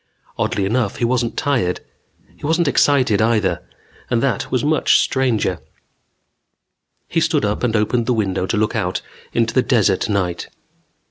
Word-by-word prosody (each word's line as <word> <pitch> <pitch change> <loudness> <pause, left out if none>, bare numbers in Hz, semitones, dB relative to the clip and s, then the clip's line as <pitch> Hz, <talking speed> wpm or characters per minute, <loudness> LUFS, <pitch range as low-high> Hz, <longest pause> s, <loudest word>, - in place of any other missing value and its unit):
Oddly 100 - -1
enough, 110 0 0
he 120 - -1
wasn't 120 -1 -1
tired. 120 -11 0 0.6
He - - -24
wasn't 160 +2 +1
excited, 130 -7 +3
either. 105 -6 +1 0.5
And 120 - +1
that 135 -3 -1
was 130 - 0
much 155 0 +3
stranger. 115 -9 0 1.5
He - - 0
stood - - +1
up 105 0 -2
and 120 -3 0
opened 115 +2 0
the 125 - +2
window 95 -4 -1
to 110 - -1
look 105 0 0
out - - -2 0.3
into 115 -1 0
the 130 - +4
desert 110 -6 +1
night. 90 -4 -2
115 Hz, 150 wpm, -19 LUFS, 100-130 Hz, 1.5 s, the